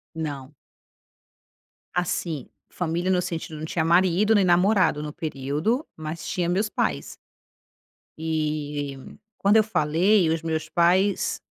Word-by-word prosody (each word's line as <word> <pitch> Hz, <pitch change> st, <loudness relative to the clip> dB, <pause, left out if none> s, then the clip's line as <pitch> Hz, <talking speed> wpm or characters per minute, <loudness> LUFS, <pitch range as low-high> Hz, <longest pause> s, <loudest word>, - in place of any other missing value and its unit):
Não. 145 Hz, -3 st, -5 dB, 1.4 s
Assim. 165 Hz, -5 st, -2 dB, 0.2 s
Família 175 Hz, +1 st, -2 dB
no 180 Hz, -1 st, +3 dB
sentido 165 Hz, -3 st, -5 dB
não 155 Hz, -, -6 dB
tinha 160 Hz, 0 st, -1 dB
marido 185 Hz, +5 st, +3 dB
nem 200 Hz, -2 st, +4 dB
namorado 180 Hz, -3 st, +3 dB
no 150 Hz, -1 st, -5 dB
período, 155 Hz, -, -2 dB
mas 155 Hz, +1 st, -6 dB
tinha 175 Hz, -2 st, -1 dB
meus 200 Hz, +5 st, +1 dB
pais. 70 Hz, -, -2 dB, 1.0 s
E 150 Hz, -3 st, -2 dB, 0.4 s
quando 200 Hz, +2 st, +4 dB
eu 215 Hz, -, +6 dB
falei, 180 Hz, 0 st, +2 dB
os 165 Hz, 0 st, 0 dB
meus 160 Hz, -1 st, -2 dB
pais 185 Hz, +4 st, +2 dB
165 Hz, 120 wpm, -24 LUFS, 155-185 Hz, 1.4 s, eu